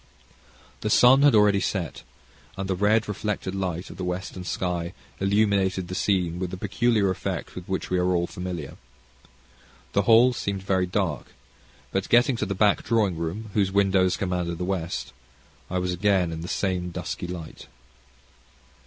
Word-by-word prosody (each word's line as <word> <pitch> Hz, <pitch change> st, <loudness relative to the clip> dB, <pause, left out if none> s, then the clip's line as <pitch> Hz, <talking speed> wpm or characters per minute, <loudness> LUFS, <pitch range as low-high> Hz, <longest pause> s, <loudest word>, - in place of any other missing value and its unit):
The 105 Hz, -, -2 dB
sun 125 Hz, +5 st, +6 dB
had 145 Hz, -4 st, +6 dB
already 105 Hz, -1 st, +5 dB
set, 90 Hz, -5 st, -3 dB, 0.6 s
and 95 Hz, 0 st, -3 dB
the 95 Hz, -, 0 dB
red 105 Hz, +4 st, +2 dB
reflected 105 Hz, -2 st, -3 dB
light 90 Hz, -3 st, -3 dB
of -, -, -11 dB
the 95 Hz, -, -4 dB
western 90 Hz, +1 st, -4 dB
sky 90 Hz, -1 st, -2 dB, 0.3 s
illuminated 100 Hz, -2 st, +1 dB
the -, -, -5 dB
scene 90 Hz, -3 st, 0 dB
with 90 Hz, -1 st, -2 dB
the 95 Hz, -, -6 dB
peculiar 105 Hz, 0 st, +1 dB
effect 95 Hz, -, -4 dB
with 90 Hz, -1 st, -8 dB
which 95 Hz, -1 st, -3 dB
we 90 Hz, -, +2 dB
are 90 Hz, 0 st, +2 dB
all 85 Hz, 0 st, +1 dB
familiar. 90 Hz, -6 st, -6 dB, 1.2 s
The 100 Hz, -, +3 dB
hall 115 Hz, +4 st, +6 dB
seemed 100 Hz, -4 st, -3 dB
very 95 Hz, -1 st, +1 dB
dark, 90 Hz, -6 st, -2 dB, 0.6 s
but, 95 Hz, 0 st, -2 dB
getting 120 Hz, +2 st, +4 dB
to 105 Hz, -, -2 dB
the 100 Hz, -, -2 dB
back 105 Hz, +1 st, +3 dB
drawing 105 Hz, -6 st, +1 dB
room, 90 Hz, +7 st, -4 dB
whose 100 Hz, -3 st, +1 dB
windows 95 Hz, -2 st, +3 dB
command 90 Hz, -3 st, -2 dB
the 90 Hz, -, -3 dB
west, 90 Hz, -8 st, -3 dB, 0.6 s
I 90 Hz, -, -2 dB
was 90 Hz, 0 st, -1 dB
again 95 Hz, -2 st, +2 dB
in 80 Hz, 0 st, -5 dB
the 85 Hz, -, -6 dB
same 90 Hz, -2 st, -1 dB
dusky 90 Hz, +1 st, -5 dB
light. 85 Hz, -3 st, -8 dB
95 Hz, 165 wpm, -25 LUFS, 90-105 Hz, 1.2 s, sun